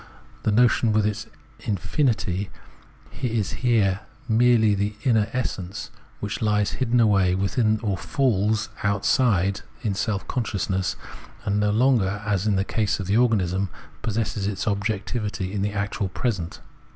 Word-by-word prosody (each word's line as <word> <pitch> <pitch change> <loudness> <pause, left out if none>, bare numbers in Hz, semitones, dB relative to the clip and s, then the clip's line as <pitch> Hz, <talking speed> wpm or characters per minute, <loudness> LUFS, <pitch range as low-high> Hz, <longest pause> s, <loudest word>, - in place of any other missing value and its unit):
The 110 - +1
notion 115 0 +4
with 105 -1 +3
its 105 +1 -2 0.3
iniinity 100 - -1 0.7
is 115 -6 0
here 105 -6 +2 0.3
merely 115 -2 +4
the 100 +1 -1
inner 110 -6 +3
essence, 100 -7 -4 0.3
which 105 0 -4
lies 105 -2 +2
hidden 125 -2 +1
away 100 -5 +4
within 110 +3 +1
or 100 -4 -1
falls 110 -5 +1
outside 100 -1 +2 0.2
in 105 -4 0
self 100 0 -2
consciousness, 95 -5 -1 0.5
and 100 -1 +1
no 105 0 +2
longer, 105 -3 +2
as 105 -1 0
in 105 - +2
the 95 +1 +1
case 105 -3 0
of 95 - -3
the 100 +4 +2
organism, 100 -6 +2 0.3
possesses 110 -2 -1
its 105 0 -3
objectivity 100 -1 -2
in 100 - -1
the 100 +1 -1
actual 100 -1 -2
present. 95 -5 -3
105 Hz, 140 wpm, -24 LUFS, 100-115 Hz, 0.7 s, notion